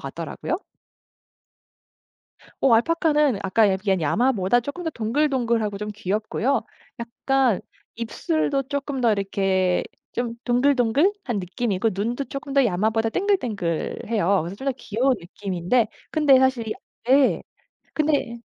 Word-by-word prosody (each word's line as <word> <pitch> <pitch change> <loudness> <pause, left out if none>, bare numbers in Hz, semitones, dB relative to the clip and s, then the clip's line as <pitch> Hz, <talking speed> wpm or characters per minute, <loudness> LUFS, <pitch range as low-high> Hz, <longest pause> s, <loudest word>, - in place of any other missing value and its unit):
같더라고요. 340 - -4 2.0
어 265 - +4
알파카는 300 0 +3
아까 200 +2 +3
얘기한 190 -1 0
야마보다 225 - +2
쪼끔 285 +8 -6
더 320 - -1
동글동글하고 235 -4 0
좀 210 +1 -4
귀엽고요. 215 +5 -1 0.4
약간 240 -1 +1 0.4
입술도 275 +4 -1
쪼끔 280 0 -3
더 235 -3 +4
이렇게 195 -2 +1 0.3
좀 235 -1 -2
동글동글한 265 - +2
느낌이고 195 +3 -1
눈도 235 +8 -2
쪼끔 275 +1 -7
더 275 -1 +5
야마보다 220 +2 +1
땡글땡글해요. 210 - 0
그래서 175 +3 -6
좀 270 - -8
더 275 - +2
귀여운 255 +2 0
느낌인데 185 +5 -1 0.2
근데 295 -4 +5
사실 260 -4 +1
이 - - -2 0.4
예. 275 0 +4 0.5
근데 290 -6 0
235 Hz, 290 characters per minute, -23 LUFS, 205-275 Hz, 2.0 s, 더